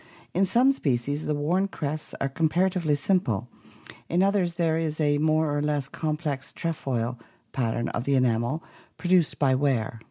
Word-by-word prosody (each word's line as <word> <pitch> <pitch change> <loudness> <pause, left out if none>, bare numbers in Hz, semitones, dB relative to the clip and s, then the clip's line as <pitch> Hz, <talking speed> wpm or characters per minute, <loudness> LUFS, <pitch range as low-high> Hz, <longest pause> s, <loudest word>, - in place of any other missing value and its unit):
In 190 +2 +2
some 245 +8 +5
species 145 - -1
the 150 - +1
worn 175 +7 +1
crests 155 -4 -4
are 135 - 0
comparatively 165 +2 +1
simple, 135 - 0 0.6
in 175 +3 +3
others 195 -3 +2
there 165 -2 +1
is 160 -1 -2
a 145 -1 +2
more 155 -1 +2
or 145 - 0
less 145 -2 -1
complex 150 -3 -3
"trefoil" 125 -7 -2 0.3
pattern 120 -2 -1
of 120 - -3
the 140 - +2
enamel 125 +4 +1 0.3
produced 180 -3 +2
by 135 -3 +3
wear. 130 -5 0
150 Hz, 155 wpm, -26 LUFS, 135-170 Hz, 0.6 s, some